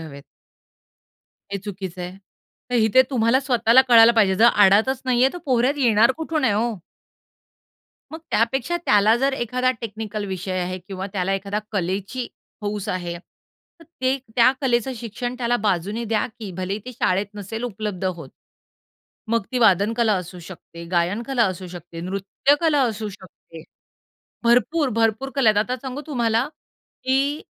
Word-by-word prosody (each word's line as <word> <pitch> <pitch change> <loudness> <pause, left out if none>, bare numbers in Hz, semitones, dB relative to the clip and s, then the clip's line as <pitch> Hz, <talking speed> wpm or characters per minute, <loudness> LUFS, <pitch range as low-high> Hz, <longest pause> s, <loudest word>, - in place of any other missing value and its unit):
हवेत. 140 -3 -10 1.3
हे 200 - -1
चुकीच 190 -2 -7
आहे. 180 +1 -6 0.5
तर - - -1
इथे 225 +3 +5
तुम्हाला 240 +1 +2
स्वतःला 245 -2 +4
कळायला 230 -1 +8
पाहिजे. 210 -5 +3
जर 220 +5 +4
आडातच 215 +5 +4
नाही 250 -1 +2
आहे 265 - +2
तर 355 - -6
पोहऱ्यात 260 +2 +2
येणार 235 -1 +4
कुठून 320 -2 -2
आहे 230 - +3
हो. 220 0 -1 1.3
मग 320 - -6
त्यापेक्षा 250 +9 +1
त्याला 210 +2 +5
जर 270 +3 +1
एखादा 250 0 0
टेक्निकल 215 -1 -5
विषय 185 0 -3
आहे 185 +1 -3
किंवा 190 +1 -7
त्याला 190 -1 -1
एखाद्या 200 +2 -3
कलेची 200 +6 -2 0.4
हौस 205 0 -3
आहे 175 -3 -3
तर 330 - -25 0.2
ते 260 +1 +1 0.2
त्या 240 +1 +6
कलेचं 255 -1 +1
शिक्षण 235 +2 -5
त्याला 245 -1 +1
बाजूने 205 +2 -1
द्या 220 -1 0
की. 210 - -6
भलेही 185 +2 -3
ते 255 - -7
शाळेत 195 -3 0
नसेल 210 +3 -6
उपलब्ध 210 -4 -4
होत. 170 -6 -3 1.0
मग 230 -2 +1
ती 250 - 0
वादनकला 220 +1 +3
असू 180 0 -7
शकते, 170 -1 -11
गायनकला 225 +9 +1
असू 185 -1 -5
शकते, 175 -1 -9
नृत्यकला 270 - +1
असू 220 -3 -2
शकते. 185 -4 -13 0.8
भरपूर, 260 +6 +3
भरपूर 230 +3 0
कला 265 -5 +3
आहेत. 210 - +1
आता 245 +5 0
सांगू 265 +1 -5
तुम्हाला, 240 -2 0 0.6
की 275 +3 +1
220 Hz, 150 wpm, -22 LUFS, 190-250 Hz, 1.3 s, कळायला